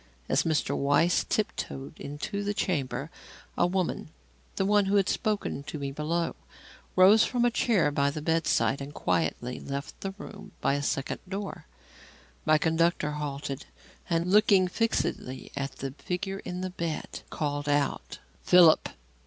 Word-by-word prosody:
As 140 - +3
Mr. 160 -3 0
Weiss 145 +5 +3
tiptoed 155 -8 -3
into 150 +8 -4
the 205 +1 -2
chamber, 140 -5 -2 0.4
a 175 - +3
woman 180 -3 -1 0.5
the 195 - 0
one 205 0 +4
who 195 +1 +1
had 195 -2 +4
spoken 210 -9 -1
to 155 - -5
me 140 -1 -3
below 160 +4 -1 0.6
rose 195 +4 +7
from 245 -1 +1
a 240 - +3
chair 210 -10 +2
by 140 0 +2
the 150 +2 -4
bedside 160 -3 +1
and 140 +2 -7
quietly 85 +10 -1
left 140 0 -6
the 195 0 -4
room 205 -1 -10
by - - +1
a 140 - 0
second 135 -1 -2
door. 195 - -5 0.8
My 155 - +6
conductor 160 -1 +1
halted, 145 -2 -4 0.4
and 170 +1 +1
looking 200 -2 +5
fixedly 180 - -2
at 140 0 -3
the 135 0 -5
figure 195 +6 -4
in 180 -1 -5
the 185 0 -3
bed, 170 -3 -4
called 145 -1 -2
out: 145 -1 0 0.2
"Philip! 175 -3 +6
165 Hz, 150 wpm, -28 LUFS, 145-195 Hz, 0.8 s, rose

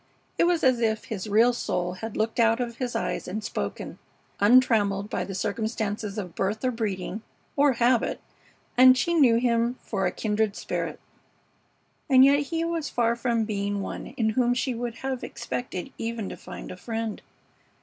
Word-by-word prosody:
It - - +5
was 345 -1 +2
as 255 -2 +4
if 220 -2 0
his 210 -1 -5
real 230 +4 +5
soul 180 -6 -2
had 220 +4 -6
looked 220 +2 -1
out 230 0 +4
of 235 -2 -3
his 250 -2 -3
eyes - - -2
and 210 +4 -4
spoken, - - -5 0.4
untrammeled 205 -3 +4
by - - -1
the 195 - -6
circumstances 215 0 -2
of 180 -5 -5
birth 210 +5 -2
or 255 - +2
breeding 210 -3 -3 0.3
or 285 -1 +4
habit, 240 0 +2 0.6
and 255 +1 +8
she 340 +5 +1
knew 270 -8 +5
him 235 0 +1
for 195 -4 -1
a - - -1
kindred 215 0 -1
spirit. - - -4 1.1
And 260 -1 +8
yet 280 +1 +5
he 325 +3 -2
was 335 -3 -2
far 235 -1 +1
from 235 -2 0
being 205 -1 -2
one - - -6
in 220 -2 +2
whom 245 +2 +2
she 255 +1 -1
would 235 -1 -4
have 265 -2 -2
expected 245 -7 -5
even 225 -3 -3
to - - -6
find - - -9
a 180 - -8
friend. 225 +2 -4
230 Hz, 175 wpm, -26 LUFS, 210-250 Hz, 1.1 s, and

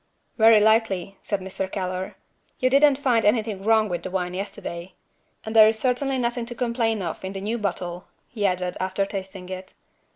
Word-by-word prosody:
"Very 225 -1 +7
likely," 210 -3 +1
said 205 -2 -2
Mr. 190 0 -4
Keller. 185 -1 -4 0.4
"You 255 0 +1
didn't 280 0 +5
find 250 -5 +2
anything 210 -2 +1
wrong 220 0 +3
with 175 -3 -3
the - - -5
wine 180 -1 -2
yesterday. 180 -2 -6 0.5
And 220 +1 -5
there 215 -1 +9
is 220 0 +1
certainly 260 +3 0
nothing 240 -1 -1
to 240 - -7
complain 230 -4 0
of 170 +1 -5
in 190 +1 -5
the 195 - -5
new 220 +4 -2
bottle," 180 -3 -3 0.2
he 215 -4 -5
added, 180 -2 0
after 190 +1 -1
tasting 190 -2 -7
it. 185 0 -8
205 Hz, 185 wpm, -24 LUFS, 185-230 Hz, 0.5 s, there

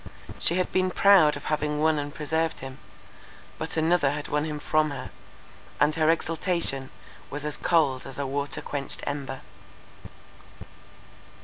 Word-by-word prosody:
She 170 - +3
had 185 0 0
been 185 0 +2
proud 185 -6 +5
of 145 - -10
having 150 -1 -1
won 155 0 +3
and 145 0 -4
preserved 160 +1 -1
him—but 135 +4 -10
another 160 -2 +3
had 145 +1 -4
won 150 +1 0
him 155 -1 -4
from 155 +1 +1
her, 130 -3 -7 0.7
and 150 +1 +4
her 155 0 +2
exultation 165 -4 0 0.4
was 145 +1 -5
as 150 - 0
cold 145 -7 +1
as 135 - -9
a 140 - -2
water 140 +1 -2
quenched 140 -1 -2
ember. 140 -2 -4
150 Hz, 140 wpm, -26 LUFS, 140-160 Hz, 0.7 s, proud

